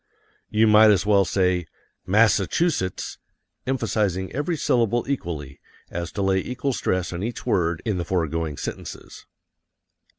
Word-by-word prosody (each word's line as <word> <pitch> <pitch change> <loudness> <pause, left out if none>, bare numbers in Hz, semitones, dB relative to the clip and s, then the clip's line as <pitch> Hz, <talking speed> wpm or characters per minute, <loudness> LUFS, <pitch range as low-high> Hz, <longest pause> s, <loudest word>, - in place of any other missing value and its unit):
You 110 +1 +3
might 110 0 +7
as 100 -2 +3
well 100 -2 +4
say 90 -2 +1 0.4
MASS 110 +3 +5
A 100 - -2
CHU 175 +1 +2
SETTS, 95 - -4 0.5
emphasizing 105 -7 -1
every 150 +5 -1
syllable 120 -3 +1
equally, 80 - -4 0.3
as 85 -1 -4
to 100 - -2
lay 95 0 +2
equal 125 +6 -2
stress 90 -5 -1
on 85 - -4
each 115 +3 -4
word 85 -3 0
in 105 -5 -1
the 85 - -2
foregoing 80 -4 -1
sentences. - - -7
95 Hz, 145 wpm, -24 LUFS, 85-115 Hz, 0.5 s, might